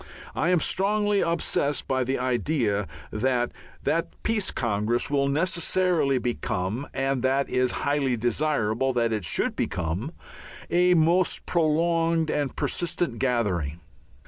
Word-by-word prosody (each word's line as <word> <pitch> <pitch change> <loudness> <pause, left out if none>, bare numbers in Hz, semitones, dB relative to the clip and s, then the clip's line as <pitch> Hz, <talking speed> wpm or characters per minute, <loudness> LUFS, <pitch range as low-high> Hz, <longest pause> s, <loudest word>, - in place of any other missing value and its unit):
I 165 - +1
am 180 -2 +4
strongly 205 +3 +1
obsessed 165 -4 0
by 130 -1 +1
the 130 +2 -1
idea 120 -4 0 0.2
that 120 +2 0 0.3
that 165 +1 0
Peace 215 -3 +1
Congress 115 +2 -1
will 140 -1 +2
necessarily 170 -1 +1
become 120 0 -2
and 135 -1 -1
that 135 +2 +1
it - - -10
is 125 0 +2
highly 140 -3 +1
desirable 120 0 0
that 115 -2 +1
it 105 -3 -2
should 85 - 0
become 90 - -2 0.6
a 180 +1 +4
most 170 +3 +2
prolonged 165 0 +1
and 145 -2 -1
persistent 170 -8 -1
gathering. 95 - 0
135 Hz, 125 wpm, -26 LUFS, 120-165 Hz, 0.6 s, am